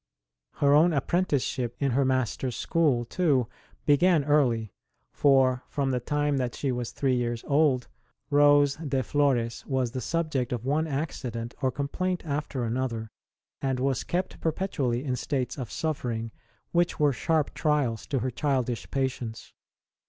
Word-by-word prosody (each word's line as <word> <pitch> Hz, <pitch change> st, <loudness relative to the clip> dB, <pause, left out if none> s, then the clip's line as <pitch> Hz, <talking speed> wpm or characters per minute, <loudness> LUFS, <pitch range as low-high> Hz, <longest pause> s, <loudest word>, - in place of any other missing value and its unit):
Her 140 Hz, 0 st, +3 dB
own 160 Hz, +3 st, +5 dB
apprenticeship 140 Hz, -6 st, 0 dB
in 140 Hz, -2 st, 0 dB
her 135 Hz, +3 st, +2 dB
Master 130 Hz, -1 st, 0 dB
s 125 Hz, -, -4 dB
school, 145 Hz, -8 st, +1 dB
too, 135 Hz, -4 st, +1 dB, 0.4 s
began 155 Hz, +2 st, +4 dB
early; 125 Hz, -8 st, +2 dB, 0.4 s
for 130 Hz, -2 st, +3 dB
from 140 Hz, -2 st, -1 dB
the 125 Hz, -, 0 dB
time 145 Hz, +3 st, 0 dB
that 125 Hz, -2 st, -2 dB
she 140 Hz, -, -1 dB
was 120 Hz, -2 st, -3 dB
three 135 Hz, -2 st, +1 dB
years 120 Hz, -1 st, -2 dB
old 140 Hz, -4 st, +2 dB, 0.4 s
Rose 145 Hz, -1 st, +5 dB
de 140 Hz, -5 st, -1 dB
Florcs 125 Hz, -5 st, +1 dB
was 130 Hz, -4 st, 0 dB
the 130 Hz, 0 st, -4 dB
subject 155 Hz, -7 st, -1 dB
of 120 Hz, -1 st, -3 dB
one 155 Hz, +4 st, +1 dB
accident 130 Hz, -6 st, -4 dB
or 130 Hz, -, +2 dB
complaint 175 Hz, +7 st, -2 dB
after 145 Hz, -3 st, -2 dB
another, 115 Hz, -1 st, -2 dB, 0.5 s
and 130 Hz, -2 st, -1 dB
was 135 Hz, -1 st, 0 dB
kept 180 Hz, +1 st, -3 dB
perpetually 140 Hz, -8 st, -1 dB
in 130 Hz, -2 st, 0 dB
states 130 Hz, 0 st, -2 dB
of 130 Hz, -5 st, -5 dB
suffering 120 Hz, -8 st, -3 dB, 0.4 s
which 175 Hz, 0 st, +1 dB
were 145 Hz, -2 st, +4 dB
sharp 155 Hz, +2 st, 0 dB
trials 145 Hz, -8 st, 0 dB
to 135 Hz, -4 st, -1 dB
her 130 Hz, -, -1 dB
childish 130 Hz, -3 st, -1 dB
patience. 130 Hz, -4 st, -3 dB
135 Hz, 150 wpm, -27 LUFS, 125-150 Hz, 0.5 s, own